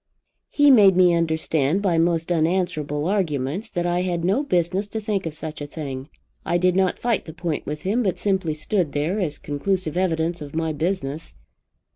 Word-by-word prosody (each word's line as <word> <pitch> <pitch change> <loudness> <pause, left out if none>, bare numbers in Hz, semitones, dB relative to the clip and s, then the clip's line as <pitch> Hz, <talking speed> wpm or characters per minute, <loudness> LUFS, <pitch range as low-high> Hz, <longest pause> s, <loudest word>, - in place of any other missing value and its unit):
"He 290 -1 +5
made 200 -7 +7
me 180 -1 +5
understand 160 +1 +1
by 175 -4 +2
most 165 0 +1
unanswerable 160 -3 0
arguments, 180 - -1
that 175 -4 -2
I 175 0 +1
had 175 -2 -1
no 195 +9 +2
business 185 - 0
to 220 - -4
think 205 -4 -2
of 155 - -6
such 155 -1 -6
a 145 - -4
thing. 140 -2 -6 0.3
I 175 - +1
did 180 0 +2
not 190 -1 +2
fight 235 -3 -1
the 160 - -9
point 165 -3 -3
with 150 +2 -5
him, 210 +6 +1
but 195 -6 0
simply 190 -6 0
stood 160 0 -1
there, 155 +8 -1
as 160 -7 -2
conclusive 155 +3 -2
evidence 170 -2 0
of 145 0 -8
my 160 -1 -1
business. 160 -2 -3
175 Hz, 185 wpm, -23 LUFS, 155-190 Hz, 0.3 s, made